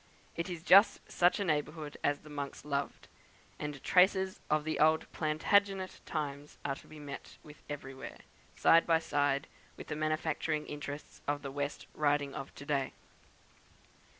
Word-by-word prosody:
It 170 Hz, +2 st, -3 dB
is 170 Hz, -2 st, -5 dB
just 200 Hz, +5 st, +7 dB
such 175 Hz, +3 st, +4 dB
a -, -, +1 dB
neighbourhood 150 Hz, -1 st, -1 dB
as 145 Hz, 0 st, +1 dB
the 155 Hz, -, -13 dB
monks 145 Hz, -1 st, -5 dB
loved, 140 Hz, -1 st, -3 dB, 0.5 s
and 150 Hz, -2 st, -5 dB
traces 190 Hz, +1 st, +4 dB
of 155 Hz, 0 st, +2 dB
the 160 Hz, +1 st, -2 dB
old 155 Hz, +1 st, +4 dB
Plantagenet 190 Hz, +5 st, +1 dB
times 145 Hz, -2 st, -4 dB
are 140 Hz, -, +1 dB
to -, -, -12 dB
be 155 Hz, -, -12 dB
met 145 Hz, -2 st, -8 dB
with 150 Hz, -1 st, -14 dB
everywhere, 135 Hz, -2 st, -7 dB, 0.4 s
side 165 Hz, -, +5 dB
by 165 Hz, -1 st, +5 dB
side 145 Hz, -3 st, +1 dB, 0.3 s
with -, -, -9 dB
the -, -, -2 dB
manufacturing 155 Hz, 0 st, -1 dB
interests 145 Hz, 0 st, -7 dB
of 145 Hz, -1 st, -1 dB
the 140 Hz, -, -4 dB
West 145 Hz, +1 st, -3 dB
Riding 145 Hz, -2 st, +1 dB
of 135 Hz, 0 st, -6 dB
to 140 Hz, -, -9 dB
day. 140 Hz, -2 st, 0 dB
150 Hz, 155 wpm, -33 LUFS, 145-160 Hz, 0.5 s, just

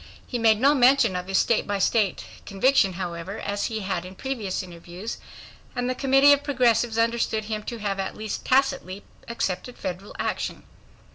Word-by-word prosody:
He 245 Hz, -, -4 dB
made 220 Hz, -2 st, +4 dB
no 280 Hz, +4 st, +5 dB
mention 255 Hz, -6 st, +4 dB
of 180 Hz, 0 st, -4 dB
his 195 Hz, 0 st, +1 dB
state 235 Hz, -, +2 dB
by 205 Hz, 0 st, -1 dB
state 200 Hz, 0 st, +1 dB, 0.2 s
conviction, 200 Hz, -1 st, +3 dB
however, 175 Hz, +2 st, -5 dB
as 205 Hz, 0 st, -2 dB
he 220 Hz, -1 st, -4 dB
had 185 Hz, -3 st, -2 dB
in 185 Hz, +1 st, -10 dB
previous 215 Hz, -6 st, -3 dB
interviews, 175 Hz, +4 st, -8 dB, 0.6 s
and 245 Hz, 0 st, -1 dB
the 255 Hz, -, 0 dB
Committee 270 Hz, +2 st, +5 dB
of 285 Hz, 0 st, 0 dB
Progressives 240 Hz, -5 st, +2 dB
understood 230 Hz, -1 st, +1 dB
him 215 Hz, -1 st, -3 dB
to 235 Hz, -, -5 dB
have 200 Hz, -2 st, -3 dB
at 195 Hz, -, -4 dB
least 215 Hz, -1 st, -5 dB
tacitly 260 Hz, -8 st, +1 dB, 0.2 s
accepted 235 Hz, +1 st, -3 dB
federal 185 Hz, +3 st, -6 dB
action. -, -, -3 dB
220 Hz, 170 wpm, -25 LUFS, 190-250 Hz, 0.6 s, no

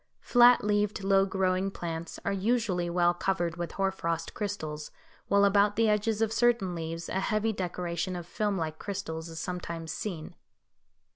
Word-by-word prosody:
Flat 245 Hz, -1 st, +6 dB
leaved, 205 Hz, -1 st, 0 dB
low 195 Hz, 0 st, +4 dB
growing 190 Hz, 0 st, +1 dB
plants 170 Hz, -3 st, -5 dB
are -, -, +1 dB
usually 195 Hz, -4 st, 0 dB
well 175 Hz, 0 st, +3 dB
covered 175 Hz, -2 st, -1 dB
with 175 Hz, -2 st, -4 dB
hoar 195 Hz, 0 st, +1 dB
frost 165 Hz, -3 st, -3 dB
crystals, 155 Hz, -8 st, -4 dB, 0.4 s
while 200 Hz, 0 st, +4 dB
about 200 Hz, +1 st, +4 dB
the 225 Hz, 0 st, +3 dB
edges 215 Hz, +1 st, +1 dB
of 220 Hz, 0 st, 0 dB
certain 235 Hz, -6 st, +2 dB
leaves 165 Hz, 0 st, -5 dB
a 190 Hz, -, -1 dB
heavy 215 Hz, +3 st, 0 dB
decoration 180 Hz, -1 st, -3 dB
of 175 Hz, -1 st, -5 dB
film 205 Hz, +2 st, -1 dB
like 155 Hz, -2 st, -3 dB
crystals 170 Hz, -5 st, -5 dB
is 165 Hz, 0 st, -7 dB
sometimes 170 Hz, -2 st, -4 dB
seen. 170 Hz, -5 st, -5 dB
190 Hz, 160 wpm, -29 LUFS, 170-205 Hz, 0.4 s, Flat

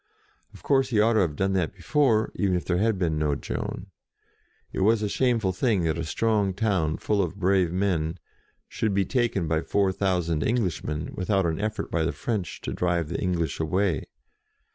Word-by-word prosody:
Of -, -, -16 dB
course 135 Hz, -2 st, +2 dB
he 110 Hz, -4 st, +1 dB
ought 115 Hz, +2 st, +4 dB
to 110 Hz, -, +3 dB
have 85 Hz, -7 st, +1 dB
done 95 Hz, +4 st, 0 dB
that 90 Hz, -4 st, -1 dB
before, 130 Hz, -8 st, +2 dB
even 95 Hz, -2 st, +1 dB
if 85 Hz, -4 st, -2 dB
there 90 Hz, +3 st, 0 dB
had 110 Hz, 0 st, +2 dB
been 80 Hz, -4 st, 0 dB
no 75 Hz, -2 st, +1 dB
Joan. -, -, -5 dB, 0.8 s
It -, -, -3 dB
was 110 Hz, +3 st, +3 dB
a -, -, +1 dB
shameful 115 Hz, -4 st, +1 dB
thing 105 Hz, -2 st, +1 dB
that 80 Hz, 0 st, 0 dB
a -, -, -1 dB
strong 100 Hz, +2 st, 0 dB
town, 95 Hz, -7 st, 0 dB
full 105 Hz, -2 st, 0 dB
of 90 Hz, -1 st, -2 dB
brave 95 Hz, -3 st, +2 dB
men, 90 Hz, -3 st, 0 dB, 0.5 s
should 105 Hz, -3 st, -1 dB
be 100 Hz, -1 st, +2 dB
taken 115 Hz, -7 st, 0 dB
by 80 Hz, 0 st, +1 dB
four 95 Hz, +1 st, +1 dB
thou 95 Hz, -1 st, +1 dB
sand 80 Hz, -2 st, -1 dB
Englishmen, 90 Hz, -9 st, -1 dB
without 95 Hz, 0 st, 0 dB
an 80 Hz, +3 st, -1 dB
effort 110 Hz, -1 st, -3 dB
by 85 Hz, -, +1 dB
the 80 Hz, -, -1 dB
French 105 Hz, -7 st, -3 dB
to -, -, -4 dB
drive 85 Hz, -3 st, 0 dB
the -, -, -3 dB
English 85 Hz, -5 st, -1 dB
away. 90 Hz, 0 st, 0 dB
95 Hz, 195 wpm, -26 LUFS, 85-110 Hz, 0.8 s, ought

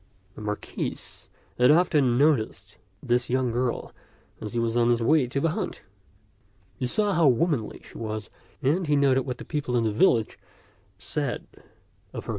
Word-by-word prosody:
The -, -, -11 dB
Marquis 105 Hz, 0 st, -4 dB, 0.6 s
had 125 Hz, -, +6 dB
often 150 Hz, -7 st, +4 dB
noticed 140 Hz, -6 st, +1 dB, 0.2 s
this 120 Hz, +1 st, +1 dB
young 130 Hz, -1 st, +1 dB
girl 120 Hz, +1 st, -2 dB, 0.5 s
as 105 Hz, -, -6 dB
he 120 Hz, -, 0 dB
was 115 Hz, 0 st, 0 dB
on 120 Hz, 0 st, +3 dB
his 120 Hz, -1 st, +2 dB
way 145 Hz, +1 st, +3 dB
to 135 Hz, +3 st, -2 dB
the 165 Hz, +3 st, +1 dB
hunt. -, -, -4 dB, 1.0 s
He 125 Hz, -, 0 dB
saw 205 Hz, +8 st, +1 dB
how 165 Hz, -4 st, +4 dB
womanly 135 Hz, -2 st, +1 dB
she -, -, -12 dB
was, 110 Hz, -1 st, -5 dB, 0.3 s
and 160 Hz, +6 st, +1 dB
he 150 Hz, -, +3 dB
noted 135 Hz, -2 st, +3 dB
what 125 Hz, -1 st, -3 dB
the -, -, -9 dB
people 140 Hz, -5 st, -2 dB
in 115 Hz, -, +2 dB
the 110 Hz, -, +1 dB
village 115 Hz, -, +2 dB, 0.6 s
said 130 Hz, +7 st, -3 dB, 0.7 s
of -, -, -5 dB
her -, -, -15 dB
goodness. -, -, -8 dB
125 Hz, 175 wpm, -26 LUFS, 115-150 Hz, 1.0 s, had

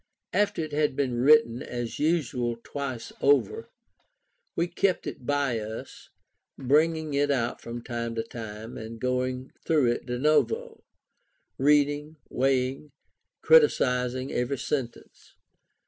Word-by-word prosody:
After 205 Hz, -5 st, +1 dB
it 155 Hz, -, -6 dB
had 150 Hz, -2 st, +1 dB
been 135 Hz, -3 st, 0 dB
written 135 Hz, -4 st, +5 dB
as 120 Hz, -1 st, -5 dB
usual 130 Hz, -7 st, 0 dB
twice 130 Hz, -5 st, -5 dB
over, 285 Hz, -, +2 dB, 0.9 s
we 170 Hz, -, +1 dB
kept 185 Hz, +2 st, 0 dB
it 125 Hz, -, -7 dB
by 140 Hz, -5 st, +1 dB
us, 110 Hz, +1 st, -8 dB, 0.5 s
bringing 155 Hz, +3 st, +2 dB
it 145 Hz, +1 st, +2 dB
out 120 Hz, -4 st, -1 dB
from 120 Hz, 0 st, -7 dB
time 115 Hz, -1 st, -4 dB
to 115 Hz, -, -1 dB
time, 110 Hz, -1 st, -8 dB
and 115 Hz, +1 st, -8 dB
going 125 Hz, +1 st, -2 dB
through 145 Hz, -7 st, +3 dB
it 120 Hz, -, -4 dB
de 125 Hz, 0 st, -2 dB
novo, 450 Hz, -, +1 dB, 0.8 s
reading, 145 Hz, +2 st, +2 dB
weighing, 130 Hz, 0 st, +1 dB
and 150 Hz, -, -20 dB, 0.5 s
criticizing 130 Hz, -, +3 dB
every 125 Hz, +3 st, -1 dB
sentence. 130 Hz, -2 st, -5 dB
135 Hz, 125 wpm, -27 LUFS, 120-150 Hz, 0.9 s, written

